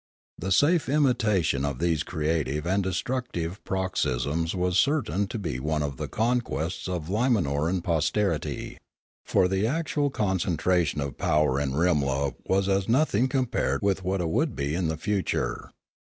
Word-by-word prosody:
The 95 - -3
safe 145 - +3
imitation 110 - +2
of 70 -3 -1
these 80 0 +1
creative 75 -2 -1
and 95 +3 +1
destructive 95 -2 -3
paroxysms 85 -3 -1
was 90 0 +1
certain 110 - +1
to 115 - -5
be 80 - -3
one 75 +2 -1
of 70 -3 -4
the - - -4
conquests 110 -8 -1
of 90 -4 -3
Limanoran 90 - +1
posterity. 85 +1 -1 0.5
For 90 - +3
the 95 +3 +1
actual 150 0 0
concentration 90 - 0
of 70 -3 -5
power 75 -3 +2
in 70 -2 -1
Rimla 70 -4 +1
was 95 0 +2
as 95 +1 +1
no 135 +7 +4
thing 120 -1 +1
compared 130 -5 0
with 100 -1 +1
what 95 +1 -1
it 85 - -1
would 145 - 0
be 70 +1 -2
in 85 0 0
the 80 0 -2
future. 85 - -2
90 Hz, 150 wpm, -26 LUFS, 75-105 Hz, 0.5 s, no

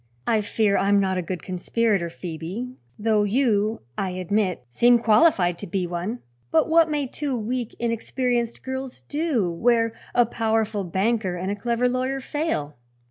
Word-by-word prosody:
"I 220 -2 +2
fear 210 -1 +1
I 195 - +1
am 205 0 +5
not 190 -1 +1
a - - 0
good 175 -1 -5
conspirator, 190 0 0
Phoebe; 175 +9 -6 0.3
though 215 0 +2
you, 215 -1 +1 0.2
I 195 - 0
admit, 185 -3 -1
seem 240 - +4
qualified 215 - +3
to 200 - -6
be 180 +1 -1
one. 175 +7 -4 0.3
But 160 - +3
what 325 0 +5
may 295 -2 0
two 270 0 -3
weak, 235 +1 -3
inexperienced 235 0 -1
girls 260 0 -5
do, 290 - 0
where 230 +5 +2 0.2
a 240 - +5
powerful 220 -2 0
banker 190 +1 0
and 185 +2 -3
a - - -1
clever 235 +3 0
lawyer 255 +2 -1
fail?" 260 - -3
220 Hz, 160 wpm, -24 LUFS, 190-245 Hz, 0.3 s, am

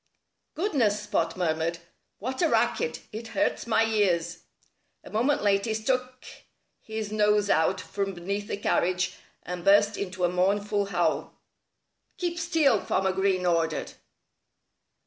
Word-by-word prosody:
"Goodness!" 275 - +1
Spot 175 -5 -1
murmured. 165 -1 0 0.4
"What 260 - -4
a 335 - +3
racket! 475 - +1
It 225 +2 -7
hurts 300 -5 0
my 225 -1 +3
ears." 180 -6 +1 0.6
A - - -12
moment 245 +6 +1
later 200 +1 +2
he - - +1
stuck 255 +3 -2 0.6
his 220 -1 -5
nose 210 -1 +2
out 170 +4 +2
from 195 +1 -3
beneath 200 +4 -4
the - - -3
carriage 180 -2 0 0.3
and 180 -1 -6
burst 205 +2 +4
into 185 -2 -4
a - - +5
mournful 200 +3 +1
howl. 175 -4 -1 0.8
"Keep 345 -1 -2
still!" 320 - +3
Farmer 190 0 +1
Green 190 -1 +1
ordered. 165 -2 0
205 Hz, 130 wpm, -27 LUFS, 180-225 Hz, 0.8 s, a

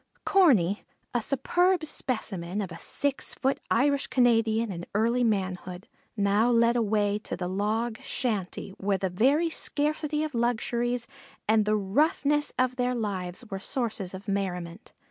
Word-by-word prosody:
Corney, 220 - +4 0.3
a 240 - +1
superb 350 +8 +1
specimen 200 - -2
of 190 -4 -3
a 165 - -8
six 285 -1 -1
foot 270 +1 0
Irish 280 +3 +2
Canadian 225 -3 +2
in 175 -1 -6
early 235 +4 +2
manhood, 185 -4 -2 0.3
now 205 +3 +3
led 235 0 +4
away 210 -2 +1
to - - -5
the 180 0 -3
log 215 +4 -1
shanty 205 -7 -3
where 195 0 +1
the 190 -1 -2
very 280 - +3
scarcity 300 0 -1
of 310 -2 -4
luxuries 240 0 0 0.4
and 215 0 +4
the 215 0 +2
roughness 290 +8 +1
of 255 0 +1
their 250 0 0
lives 200 -1 -4
were 195 - -3
sources 210 -4 -2
of 190 +3 -10
merriment. 185 -1 -3
225 Hz, 145 wpm, -27 LUFS, 195-255 Hz, 0.4 s, Corney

